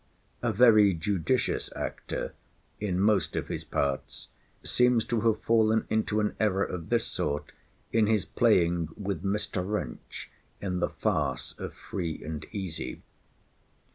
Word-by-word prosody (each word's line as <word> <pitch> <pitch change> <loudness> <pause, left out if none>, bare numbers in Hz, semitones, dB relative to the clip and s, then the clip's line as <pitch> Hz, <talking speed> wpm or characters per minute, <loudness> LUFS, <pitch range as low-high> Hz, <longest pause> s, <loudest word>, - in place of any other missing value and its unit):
A 120 - +1
very 105 -3 +6
judicious 85 0 0
actor - - -4 0.5
(in 95 -4 -1
most 100 -1 +2
of - - -2
his - - -3
parts) 70 -1 -2 0.3
seems 125 -2 +3
to 115 -2 0
have 110 -1 +1
fallen 110 -1 +3
into 110 -1 +1
an 105 0 0
error 100 -3 +2
of 90 -4 -5
this - - +2
sort 75 +1 -2 0.4
in 110 -2 +4
his 110 -5 +2
playing 85 -2 +2
with 100 -5 -3
Mr. 100 -1 0
Wrench 100 - -5 0.3
in 90 -2 -2
the - - +1
farce - - -1
of - - -6
Free 85 -4 -4
and 75 -1 -5
Easy. 95 -6 -4
100 Hz, 140 wpm, -28 LUFS, 90-110 Hz, 0.5 s, very